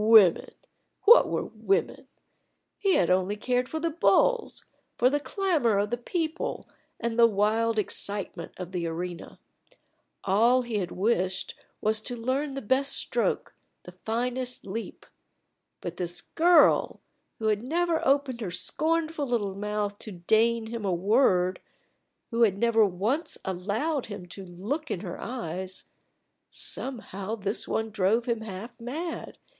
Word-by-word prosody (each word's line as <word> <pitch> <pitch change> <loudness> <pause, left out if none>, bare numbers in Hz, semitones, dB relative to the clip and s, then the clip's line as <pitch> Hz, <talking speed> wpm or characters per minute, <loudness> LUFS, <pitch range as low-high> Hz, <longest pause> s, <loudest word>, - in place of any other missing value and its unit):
Women! 215 -6 +6 0.5
What 470 +3 +8
were - - -1
women? 395 +3 -1 0.7
He 390 -2 +3
had 175 - +3
only 185 +2 +2
cared 250 +4 -1
for 320 - -3
the 335 +1 -1
bulls, 465 +8 +2 0.3
for 250 +2 +4
the 290 - +1
clamor 305 - +1
of 205 +1 0
the 240 - 0
people, 320 +6 -3 0.3
and 235 0 -2
the 230 - +8
wild 220 +2 +1
excitement 200 -4 0
of 180 -1 -7
the 175 -2 -2
arena. 170 +1 -6 0.8
All 235 +6 +4
he 230 -3 -2
had 180 -3 -3
wished 185 -2 0
for - - -29 0.2
was 215 0 +2
to 245 - -4
learn 265 +4 -2
the 275 - -5
best 265 +6 +1
stroke, - - -1 0.3
the 180 - -10
finest 245 +6 -2
leap. 215 +4 -6 0.8
But - - -6
this 175 -1 -1
girl, 345 +1 +4 0.4
who 220 -1 0
had 210 -1 +1
never 330 +5 0
opened 270 -3 +1
her 205 - -3
scornful 310 - 0
little 215 -6 -1
mouth 205 0 -3
to 215 - -7
deign 220 +6 +2
him 225 0 -5
a 195 - 0
word 185 -1 +2 0.7
who 230 0 0
had 205 -4 +4
never 225 0 +4
once 215 - 0
allowed 215 - -2
him 200 -4 -7
to 195 - -8
look 205 - -4
in 175 - -3
her 180 -4 -6
eyes 190 -6 -4 0.7
somehow 220 -5 -3
this 205 0 -2
one 220 0 -1
drove 215 +3 +1
him 235 -2 -1
half 220 +3 -8
mad. 305 +9 -5
225 Hz, 145 wpm, -27 LUFS, 195-260 Hz, 0.8 s, What